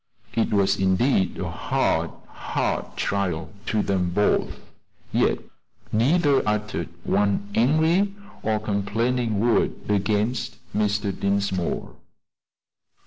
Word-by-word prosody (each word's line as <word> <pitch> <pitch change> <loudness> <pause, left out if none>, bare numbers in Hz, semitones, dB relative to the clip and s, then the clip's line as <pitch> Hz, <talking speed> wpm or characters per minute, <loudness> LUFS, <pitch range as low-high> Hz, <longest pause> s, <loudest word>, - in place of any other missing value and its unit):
It 115 - +1
was 100 -1 +2
indeed 95 +2 +2
a - - -3
hard, - - 0 0.2
hard - - -3
trial 90 -4 -1
to 110 -1 +1
them 90 -3 0
both; 105 +4 +1 0.5
yet - - +2 0.5
neither 140 +5 +3
uttered 105 0 -2
one 100 0 +1
angry 160 - +3 0.3
or 110 -1 0
complaining 110 +2 0
word 115 +1 +2 0.2
against 105 +4 0 0.2
Mr. 105 -1 +1
Dinsmore. 100 -3 -1
105 Hz, 95 wpm, -24 LUFS, 100-120 Hz, 0.5 s, neither